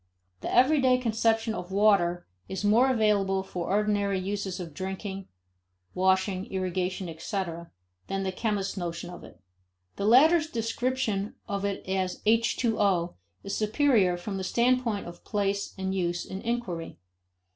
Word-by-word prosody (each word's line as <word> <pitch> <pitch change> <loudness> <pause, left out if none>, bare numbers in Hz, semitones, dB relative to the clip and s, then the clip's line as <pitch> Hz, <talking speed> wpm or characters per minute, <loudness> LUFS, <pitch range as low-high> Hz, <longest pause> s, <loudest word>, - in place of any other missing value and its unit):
The - - -4
everyday 260 0 +5
conception 225 -1 +1
of 180 -2 -6
water 190 -4 +3 0.2
is 190 0 -4
more 225 +6 +4
available 205 -5 +2
for 180 -3 -5
ordinary 205 -1 +1
uses 195 0 -3
of 170 -4 -7
drinking, 190 +2 -5 0.7
washing, 190 +1 +1
irrigation, 185 0 -2
etc., 170 0 -4 0.4
than 195 0 -2
the 190 - -1
chemist's 200 -1 -2
notion 175 -1 -4
of 175 - -10
it. - - -14 0.6
The 200 - -2
latter's 310 +7 +6
description 230 -3 -1
of 200 0 -2
it 200 -1 -3
as 190 -1 -1
H20 215 -5 +2 0.3
is 195 - -3
superior 215 -5 +3
from 195 +2 -5
the 190 - -3
standpoint 235 +1 +1
of 175 0 -10
place 200 -1 -1
and 190 0 -2
use 175 -2 -1
in 190 +1 -6
inquiry. 230 - -3
195 Hz, 135 wpm, -28 LUFS, 185-225 Hz, 0.7 s, latter's